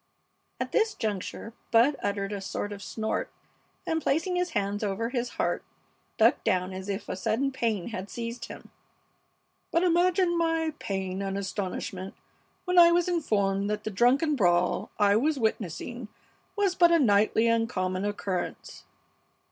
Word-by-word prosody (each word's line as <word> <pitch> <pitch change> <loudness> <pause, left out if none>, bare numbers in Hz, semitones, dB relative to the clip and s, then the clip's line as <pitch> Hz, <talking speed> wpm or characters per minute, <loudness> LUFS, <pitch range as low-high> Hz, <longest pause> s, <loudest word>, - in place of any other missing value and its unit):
(At - - -3
this 445 -2 +2
juncture 215 +1 -4 0.2
Bud 240 +6 +4
uttered 200 0 -2
a 200 - -4
sort 205 +1 -4
of 200 -1 -7
snort 220 +1 -3 0.5
and, 320 0 0
placing 330 +6 0
his 360 0 0
hands 205 +1 -1
over 210 +3 -1
his 245 -1 -2
heart, - - 0 0.5
ducked - - +4
down 185 0 0
as 190 +1 -6
if 200 +1 -3
a - - -3
sudden 250 +8 0
pain 230 -8 -1
had 195 -3 -6
seized 235 0 -5
him.) - - -11 1.0
"But 335 - +2
imagine 350 0 +3
my 325 -1 +1
pain 190 -1 -3
and 195 0 -2
astonishment 190 -1 -4 0.5
when 360 -1 +4
I 340 0 +8
was 345 0 +2
informed 200 - 0
that 210 0 -2
the 215 - -3
drunken 260 - +3
brawl 175 -6 +2
I 205 -1 +4
was 295 +5 +1
witnessing 220 +1 -2 0.5
was 405 -3 +2
but 345 -1 +5
a 335 - +6
nightly 220 -3 +3
and 230 0 +2
common 185 -3 -2
occurrence. 205 -3 -4
220 Hz, 155 wpm, -28 LUFS, 195-315 Hz, 1.0 s, I